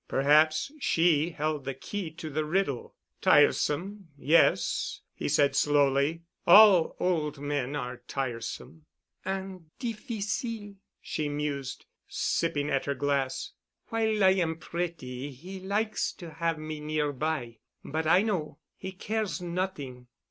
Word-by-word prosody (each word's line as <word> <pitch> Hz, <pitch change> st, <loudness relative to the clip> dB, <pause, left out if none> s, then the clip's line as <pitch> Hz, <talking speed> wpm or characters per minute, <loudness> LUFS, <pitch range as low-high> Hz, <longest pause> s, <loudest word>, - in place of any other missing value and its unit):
Perhaps 155 Hz, -, +3 dB
she 165 Hz, -, +3 dB
held 155 Hz, -3 st, -2 dB
the 135 Hz, 0 st, -4 dB
key 190 Hz, +6 st, -5 dB
to 155 Hz, 0 st, -8 dB
the 155 Hz, +2 st, 0 dB
riddle. 155 Hz, -5 st, -1 dB, 0.3 s
"Tiresome, 190 Hz, +6 st, +3 dB
yes," 155 Hz, +4 st, +2 dB
he -, -, -3 dB
said 140 Hz, -1 st, +3 dB
slowly, 145 Hz, +3 st, +2 dB, 0.2 s
"all 190 Hz, -2 st, +8 dB
old 155 Hz, -5 st, 0 dB
men 145 Hz, -1 st, -2 dB
are 125 Hz, -3 st, -4 dB
tiresome——" 135 Hz, +4 st, -5 dB, 0.4 s
"And 190 Hz, -3 st, -5 dB
difficile," 225 Hz, -2 st, -4 dB, 0.3 s
she 150 Hz, -2 st, -2 dB
mused, 145 Hz, -2 st, -3 dB, 0.2 s
sipping 145 Hz, 0 st, -1 dB
at 135 Hz, -, 0 dB
her 140 Hz, -, -1 dB
glass. 140 Hz, -2 st, -1 dB, 0.4 s
"While 220 Hz, -2 st, +1 dB
I 190 Hz, -, +7 dB
am 175 Hz, -4 st, +1 dB
pretty 155 Hz, -7 st, -4 dB
he 180 Hz, +9 st, -9 dB
likes 210 Hz, +3 st, -1 dB
to 170 Hz, -3 st, -10 dB
have 165 Hz, +1 st, -1 dB
me 155 Hz, 0 st, -6 dB
nearby. 150 Hz, -4 st, -2 dB, 0.3 s
But 160 Hz, +2 st, -2 dB
I 180 Hz, +5 st, +5 dB
know. 170 Hz, -10 st, -2 dB, 0.2 s
He 190 Hz, 0 st, -6 dB
cares 215 Hz, +1 st, -2 dB
not'ing. 170 Hz, -9 st, -4 dB
155 Hz, 125 wpm, -28 LUFS, 145-190 Hz, 0.4 s, all